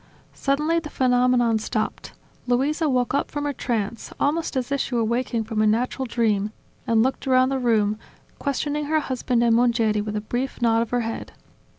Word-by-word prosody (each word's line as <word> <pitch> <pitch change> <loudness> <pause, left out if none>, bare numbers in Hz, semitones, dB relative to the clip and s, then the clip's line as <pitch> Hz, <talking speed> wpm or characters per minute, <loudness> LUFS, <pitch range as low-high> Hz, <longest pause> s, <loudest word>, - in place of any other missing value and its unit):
Suddenly 300 +4 +1
the 315 -2 -8
phenomenon 250 -3 +2
stopped. - - -3 0.3
Luisa 290 +6 +1
woke 250 -1 +1
up 280 - 0
from 290 -1 -4
her 290 - -1
trance, 230 -3 -3
almost 300 0 0
as 255 +1 -2
if 280 - +1
she 250 - -3
were 230 - +2
waking 235 0 -1
from 220 -1 -2
a 215 - +4
natural 250 +4 0
dream, 215 -4 +1 0.4
and 225 -1 +4
looked 265 +2 -2
around 255 0 +4
the 270 -1 -1
room, 215 -3 +1 0.4
questioning 290 +2 -1
her 310 +1 +2
husband 250 -3 0
and 230 -1 +4
Mongeri 230 -3 +2
with 210 0 -4
a 210 - -1
brief 245 +5 -3
nod 230 -2 +3
of 230 - -2
her 245 0 0
head. 225 0 -5
245 Hz, 190 wpm, -24 LUFS, 225-270 Hz, 0.4 s, a